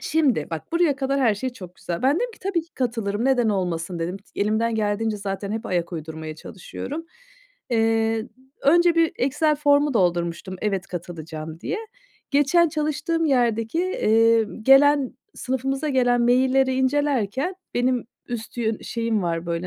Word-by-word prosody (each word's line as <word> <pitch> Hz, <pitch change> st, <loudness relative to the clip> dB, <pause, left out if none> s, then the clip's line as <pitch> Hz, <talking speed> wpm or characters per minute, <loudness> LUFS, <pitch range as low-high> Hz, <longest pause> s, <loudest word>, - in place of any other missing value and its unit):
Şimdi, 280 Hz, -, +1 dB
bak, 160 Hz, -, -6 dB
buraya 335 Hz, -5 st, +2 dB
kadar 275 Hz, 0 st, 0 dB
her 230 Hz, -5 st, +3 dB
şey 255 Hz, +6 st, -3 dB
çok 185 Hz, -8 st, -11 dB
güzel. 170 Hz, +5 st, -5 dB
Ben 270 Hz, +4 st, +3 dB
dedim 485 Hz, +6 st, -1 dB
ki, -, -, -17 dB
"Tabii 370 Hz, -3 st, -1 dB
ki 330 Hz, -, -24 dB
katılırım, 225 Hz, -4 st, -1 dB
neden 255 Hz, -4 st, +3 dB
olmasın?" 175 Hz, -3 st, -2 dB
dedim. 170 Hz, +3 st, -3 dB
T 200 Hz, -, -10 dB
elimden 220 Hz, +3 st, +1 dB
geldiğince 215 Hz, +1 st, 0 dB
zaten 200 Hz, 0 st, -4 dB
hep 220 Hz, 0 st, -4 dB
ayak 175 Hz, -1 st, -1 dB
uydurmaya 160 Hz, -1 st, -6 dB
çalışıyorum. 290 Hz, -, -7 dB, 0.6 s
Eee, 225 Hz, 0 st, +1 dB, 0.3 s
önce 345 Hz, +4 st, +5 dB
bir 330 Hz, -1 st, +3 dB
Excel 300 Hz, +3 st, +1 dB
formu 290 Hz, -1 st, +3 dB
doldurmuştum, 175 Hz, -1 st, 0 dB
"Evet, 195 Hz, -3 st, -1 dB
katılacağım." 160 Hz, -2 st, -7 dB
diye. 425 Hz, -, -3 dB, 0.5 s
Geçen 290 Hz, +5 st, +4 dB
çalıştığım 305 Hz, +1 st, -1 dB
yerdeki, 235 Hz, -1 st, +1 dB
eee, 230 Hz, -10 st, +3 dB, 0.2 s
gelen 270 Hz, +1 st, +5 dB, 0.2 s
sınıfımıza 270 Hz, +3 st, -2 dB
gelen 245 Hz, -2 st, +3 dB
mailleri 260 Hz, +2 st, +3 dB
incelerken 265 Hz, -, 0 dB, 0.2 s
benim 250 Hz, 0 st, +1 dB, 0.2 s
üst 240 Hz, -1 st, -6 dB
yön 220 Hz, -2 st, -1 dB
şeyim 230 Hz, -3 st, -1 dB
var, 170 Hz, -1 st, -2 dB
böyle, 170 Hz, +1 st, -2 dB
235 Hz, 150 wpm, -23 LUFS, 195-280 Hz, 0.6 s, önce